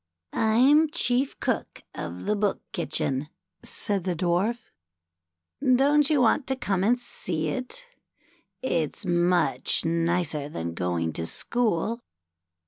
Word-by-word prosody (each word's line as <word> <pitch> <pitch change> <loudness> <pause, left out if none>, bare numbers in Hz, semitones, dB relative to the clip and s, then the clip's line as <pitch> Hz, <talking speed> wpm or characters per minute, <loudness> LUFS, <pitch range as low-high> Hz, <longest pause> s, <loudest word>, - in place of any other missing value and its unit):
"I'm 265 +8 +4
chief 270 -4 +1
cook - - -2
of 85 +2 -6
the 210 - +1
Book 205 -1 0
Kitchen," 145 -4 -1 0.3
said 200 -3 -1
the 180 -1 -1
Dwarf. 195 +8 -1 0.5
" 85 - -2
Don't 290 +2 +4
you 300 -3 +3
want 250 +3 +3
to 265 - 0
come 195 -7 -1
and 240 +4 +3
see 160 -9 -2
it? 255 - -4 0.8
It's 165 - -1
much 175 0 +2
nicer 165 -3 0
than 85 - -4
going 85 -2 -1
to 85 - -3
school. 230 - -1
185 Hz, 125 wpm, -26 LUFS, 155-245 Hz, 0.8 s, I'm